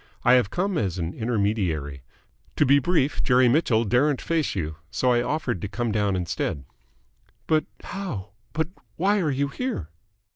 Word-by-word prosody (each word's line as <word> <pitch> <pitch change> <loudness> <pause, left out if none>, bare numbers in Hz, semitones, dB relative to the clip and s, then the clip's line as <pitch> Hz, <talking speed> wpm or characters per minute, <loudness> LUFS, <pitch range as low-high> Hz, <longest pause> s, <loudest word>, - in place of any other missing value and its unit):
I 125 - +7
have 125 -6 +4
come 185 - 0
as 95 -4 -1
an 85 +1 -3
intermediary. 100 - -1 0.5
To - - +3
be 140 +1 +6
brief, 145 -2 +1
Jerry 125 0 +4
Mitchell 120 -4 +3
daren't 125 +6 +2
face 165 -7 -1
you, 80 -4 -3
so 125 - +1
I 120 -1 +3
offered 125 - -2
to - - -3
come 110 +3 -2
down 105 -2 +1
instead." 85 -5 -2 0.8
"But 155 +2 +2 0.2
how 155 - -5 0.2
but 160 +1 -1 0.3
why 200 +4 +2
are 160 - +1
you 140 +1 0
here?" 140 - -3
125 Hz, 160 wpm, -25 LUFS, 100-150 Hz, 0.8 s, I